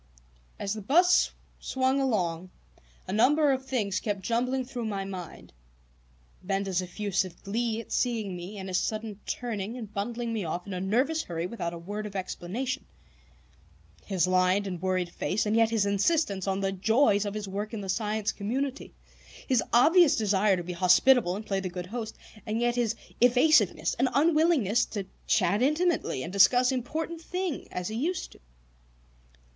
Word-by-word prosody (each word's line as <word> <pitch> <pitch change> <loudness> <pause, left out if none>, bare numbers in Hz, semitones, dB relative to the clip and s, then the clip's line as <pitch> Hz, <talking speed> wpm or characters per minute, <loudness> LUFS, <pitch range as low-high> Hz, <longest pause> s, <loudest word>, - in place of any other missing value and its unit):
As 200 0 -2
the 215 - -6
bus 350 - +4 0.3
swung 265 +1 0
along, 185 -9 -1 0.6
a 185 - -3
number 285 +7 +4
of 265 0 -1
things 215 -8 -1
kept 200 -3 -3
jumbling 250 +5 0
through 245 -2 -5
my 200 -3 -3
mind: 185 -3 -8 0.9
Benda's 195 -1 -1
effusive 185 -1 -3
glee 225 +2 -1
at - - -16
seeing 225 -6 -1
me, 180 +4 -7
and 190 -1 -6
his 185 -1 +1
sudden 215 -1 -4
turning 225 -1 -3
and 215 -4 -8
bundling 230 +3 -3
me 215 -3 -2
off 175 +2 -4
in 200 - -6
a 180 - -3
nervous 255 +12 +1
hurry 170 - -4
without 175 -4 -4
a - - -6
word 205 +5 -5
of 200 - -11
explanation; 195 +7 -4 1.2
his 190 -5 +1
lined 185 +2 +2
and 180 -4 -5
worried 185 -1 0
face 200 +5 -1
and 210 +1 +1
yet 225 -1 +4
his 225 -3 +1
insistence 200 - +1
on 195 0 0
the 195 0 0
joys 210 +2 +3
of 205 0 -4
his 210 -1 -4
work 205 +3 -4
in 220 -3 -5
The 195 - -6
Science 215 +2 -1
Community; 260 +7 -4 0.5
his 255 -3 +2
obvious 320 +6 +6
desire 200 -2 +2
to 175 - -4
be 180 +1 -5
hospitable 180 +3 +4
and 210 +2 -6
play 195 -2 -1
the 190 -1 -4
good 180 0 -6
host, 220 +2 -6 0.3
and 220 +1 -2
yet 240 0 +1
his 235 -2 0 0.3
evasiveness 245 - +4
and 260 +1 +3
unwillingness 300 - +3
to 200 -3 -5 0.2
chat 190 +4 +2
intimately 305 - +1
and 170 - -6
discuss 245 +6 +5
important 315 +6 -3
things 360 -2 -4
as 180 +1 -4
he 220 - -5
used 325 +10 -2
to. - - -17
215 Hz, 170 wpm, -28 LUFS, 190-250 Hz, 1.2 s, obvious